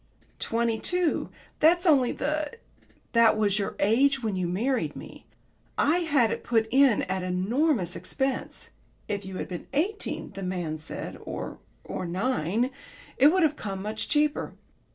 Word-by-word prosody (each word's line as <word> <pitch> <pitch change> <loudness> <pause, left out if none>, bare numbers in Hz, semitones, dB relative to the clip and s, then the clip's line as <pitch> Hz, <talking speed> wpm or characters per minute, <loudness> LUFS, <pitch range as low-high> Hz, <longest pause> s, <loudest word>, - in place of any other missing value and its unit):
"Twenty 230 -1 0
two. 360 +2 0 0.3
That's 345 +4 +4
only 275 -7 +5
the 300 +1 -2 0.3
" - - -33
"That 230 -2 +5
was 210 -1 +2
your 200 - -2
age 265 +6 +3
when 215 -3 -1
you 180 -1 -1
married 235 +9 -1
me. - - -11 0.5
I 315 +5 +3
had 285 -10 +2
it - - -3
put 225 -2 +2
in 265 -3 +5
at 190 0 -2
enormous 190 - 0
expense. 265 -1 -3 0.4
If 200 -2 -3
you 190 -1 -6
had - - -4
been 180 -2 -7
eighteen, 385 +9 -2
the 195 0 -8
man 175 -4 -3
said, 155 - -7
or - - -6 0.2
or 185 - -4
nine, 220 - 0 0.5
it 275 - +8
would 360 +3 +4
have 305 -1 +3
come 195 -5 -5
much 215 +1 -3
cheaper. 300 0 +1
230 Hz, 155 wpm, -27 LUFS, 190-290 Hz, 0.5 s, it